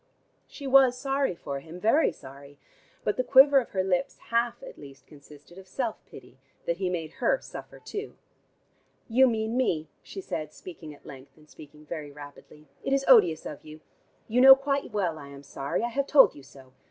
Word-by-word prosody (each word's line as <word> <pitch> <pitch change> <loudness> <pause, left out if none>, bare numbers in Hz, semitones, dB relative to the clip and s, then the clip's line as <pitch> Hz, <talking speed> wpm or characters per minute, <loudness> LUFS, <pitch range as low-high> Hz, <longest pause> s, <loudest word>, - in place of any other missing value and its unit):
She 280 - -11
was 265 -2 +5
sorry 270 -5 -1
for 140 -4 -6
him, 165 +5 -11
very 225 - +3
sorry, 140 +1 -14 0.5
but 210 - -1
the 255 - +1
quiver 275 +2 +6
of 245 - -6
her 190 -1 -1
lips 180 -1 -1
half 235 +1 0
at - - -11
least 135 -2 -14
consisted 150 +4 -16
of 190 - -15
self 230 +3 -4
pity 130 0 -15 0.3
that 170 - -1
he 185 -1 -2
made 165 -3 -4
her - - +2
suffer - - -11
too. 410 +1 -8 0.9
"You 260 +3 +4
mean 220 -1 -2
me," 165 -12 -1
she 195 - -10
said, 155 -5 -6
speaking 165 -4 -11
at - - -24
length, 135 0 -13
and 155 -1 -21
speaking 150 0 -15
very 150 -2 -7
rapidly. 145 +1 -14 0.2
"It 270 - -1
is 275 0 +1
odious 180 -11 +5
of 150 - -8
you. 155 0 -13 0.5
You 240 +3 +1
know 265 +1 +10
quite 275 +1 -2
well 180 -7 -2
I 140 - -11
am 140 0 -12
sorry: 140 +6 -4
I 235 - -1
have 275 +3 -2
told 285 -3 +6
you 145 - -13
so. 130 -1 -17
180 Hz, 195 wpm, -27 LUFS, -, 0.9 s, know